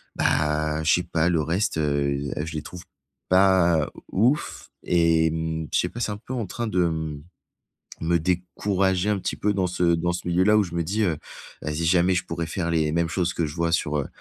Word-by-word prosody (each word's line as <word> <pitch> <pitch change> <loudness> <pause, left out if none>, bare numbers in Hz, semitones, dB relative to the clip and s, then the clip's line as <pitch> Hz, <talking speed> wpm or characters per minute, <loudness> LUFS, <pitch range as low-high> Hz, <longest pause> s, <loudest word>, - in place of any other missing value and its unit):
bah, 75 0 +1
je - - +4
sais 90 - +2
pas 85 +1 0
le 80 -3 +2
reste, 85 +3 -1
heu 70 -1 0
heu, 75 - -2
je 80 - -7
les 75 - -2
trouve 90 -1 -9 0.5
pas 90 -5 +4 0.2
ouf 120 +9 0
et 80 -2 +3
mmh, 80 -1 -3
je - - +3
sais - - 0
pas, 120 - -8
c'est 110 - -1
un 105 - -4
peu 130 - -8
en 115 -4 -2
train 120 +5 -4
de 90 -4 +1
m 80 -3 -3 0.8
me 85 +1 +2
décourager 95 +2 0
un 105 - +2
petit - - -3
peu 105 0 0
dans 95 -2 +1
ce 90 0 -2
dans 85 +1 -1
ce 90 - -5
milieu-là 95 +5 +3
où - - +5
je 85 -2 -7
me 85 - 0
dis, 105 +7 -1
heu: 85 -6 0 0.5
«Vas-y 75 +2 -2
jamais 90 +2 +3
je 85 - -1
pourrais 85 0 -3
faire 85 0 -2
les 80 -2 +1
mêmes 85 0 0
choses 90 0 -1
que 85 - -1
je 75 - -8
vois 85 0 0
sur, 75 -2 0
heu, 70 - -3
85 Hz, 225 wpm, -24 LUFS, 80-95 Hz, 0.8 s, où